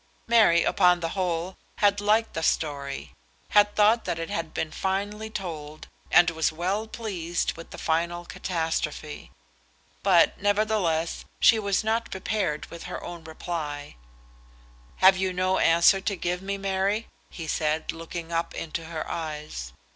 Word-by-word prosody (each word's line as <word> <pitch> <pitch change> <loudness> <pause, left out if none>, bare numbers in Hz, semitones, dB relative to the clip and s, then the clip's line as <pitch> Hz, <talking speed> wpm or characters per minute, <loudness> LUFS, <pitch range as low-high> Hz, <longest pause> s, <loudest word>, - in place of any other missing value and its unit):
Mary, 220 -8 +5
upon 180 -2 +4
the 165 -1 -2
whole, 180 -1 -2 0.2
had 205 0 +3
liked 215 +2 +2
the 165 - -3
story, 140 -4 -2 0.4
had 205 0 +4
thought 215 +2 +4
that - - -2
it 165 0 -5
had 165 -1 -3
been 155 - -3
finely 205 +4 -2
told, 155 -7 -6 0.2
and 175 -1 +6
was 160 -1 +1
well 185 +7 -2
pleased 180 -7 -2
with 165 - -10
the - - -9
final 170 +2 -1
catastrophe. 160 -4 -3 0.7
But, 185 -2 +4
nevertheless, 205 -6 +1
she 225 - +6
was 200 0 0
not 225 +2 0
prepared 190 -5 -2
with 170 - -8
her - - -5
reply. 160 -3 -6 1.0
"Have 190 0 +6
you 190 0 0
no 185 +1 +1
answer 170 +4 +5
to 200 0 -1
give 180 0 -2
me, 200 +1 -3
Mary?" 195 +3 0 0.2
he 165 - -7
said, 155 0 -1
looking 165 0 -7
up 165 0 -1
into 165 0 -4
her 160 -1 -5
eyes. 150 - -5
175 Hz, 145 wpm, -26 LUFS, 165-200 Hz, 1.0 s, and